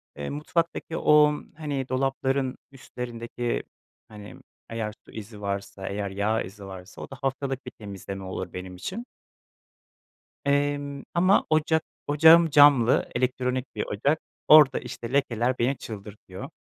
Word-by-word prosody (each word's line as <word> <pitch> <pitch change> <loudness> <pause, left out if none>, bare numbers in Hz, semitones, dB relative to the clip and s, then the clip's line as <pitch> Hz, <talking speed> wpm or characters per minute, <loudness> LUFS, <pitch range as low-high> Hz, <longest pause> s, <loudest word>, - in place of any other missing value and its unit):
Eee, 75 -1 -5
mutfaktaki 165 +2 -2
o, 150 0 +5 0.2
hani, 145 -4 -3
dolapların 135 0 0
üstlerindeki, 120 -2 -5 0.4
hani, 105 -1 -11 0.3
eğer 110 -2 -3
su - - -16
izi 105 -1 -9
varsa, 100 -1 -4
eğer 100 0 -3
yağ 105 +3 0
izi 100 +2 -10
varsa, 95 0 -10
o - - -8
da 135 - -9
haftalık 135 0 -2
bir 125 - -7
temizleme 100 -2 -8
olur 95 -1 -5
benim 90 0 -7
için. 190 - -6 1.4
Emm 145 0 0
ama 185 +3 +4
ocak 155 0 +2 0.2
ocağım 160 +3 +7
camlı, 145 -5 +6
elektronik 125 +1 -1
bir 105 - -2
ocak, 140 +10 0 0.3
orada 150 -3 +8
işte 115 +1 -7
lekeler 125 -2 +1
beni 130 +4 +1
çıldırtıyor. 100 -3 -9
125 Hz, 130 wpm, -26 LUFS, 105-145 Hz, 1.4 s, orada